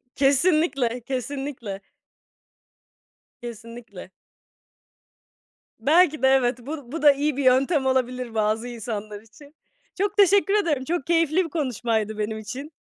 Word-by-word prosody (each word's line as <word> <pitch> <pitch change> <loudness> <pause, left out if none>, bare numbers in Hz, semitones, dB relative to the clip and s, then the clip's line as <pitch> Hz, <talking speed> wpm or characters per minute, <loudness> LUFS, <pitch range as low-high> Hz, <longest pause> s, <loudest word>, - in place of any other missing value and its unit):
Kesinlikle, 275 -3 +2
kesinlikle. 260 -6 -5 1.6
Kesinlikle. 230 -4 -10 1.7
Belki 310 +3 +3
de, 265 - +4
evet, 255 -2 +3
bu 275 -1 -8
bu 325 +1 -4
da 295 - +7
iyi 285 0 -1
bir 280 - -1
yöntem 265 +3 +3
olabilir 255 -2 -1
bazı 220 +2 0
insanlar 215 -3 -6
için. 280 +7 -18 0.5
Çok 410 0 -1
teşekkür 400 0 +4
ederim, 330 -11 +1
çok 325 +1 -3
keyifli 330 +1 +2
bir - - -7
konuşmaydı 230 -8 -2
benim 215 +1 -3
için. 260 +8 -8
265 Hz, 115 wpm, -24 LUFS, 230-305 Hz, 1.7 s, da